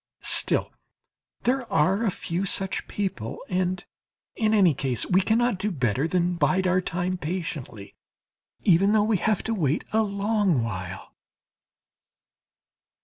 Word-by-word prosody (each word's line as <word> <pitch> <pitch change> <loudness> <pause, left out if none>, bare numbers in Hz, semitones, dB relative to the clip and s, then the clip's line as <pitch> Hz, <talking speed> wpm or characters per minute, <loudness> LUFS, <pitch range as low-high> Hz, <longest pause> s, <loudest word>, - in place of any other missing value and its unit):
Still - - +4 0.7
there 250 -1 -1
are 190 +8 +2
a 225 - +2
few 175 0 -3
such 195 +1 -1
people, 185 - -4
and 185 0 -1 0.5
in 215 -1 +1
any 195 -7 +4
case 130 -3 -2
we 185 +1 +3
cannot 230 +1 +1
do 210 - -1
better 130 - 0
than 175 0 0
bide 190 +2 +1
our 185 0 +2
time 180 +1 -3
patiently, 150 - -6 0.7
even 195 +3 +4
though 215 -1 +4
we 215 -1 +1
have 215 +2 0
to 225 - -2
wait 155 -7 0
a 220 - +4
long 200 - 0
while. 95 -4 -6
185 Hz, 135 wpm, -25 LUFS, 160-205 Hz, 0.7 s, Still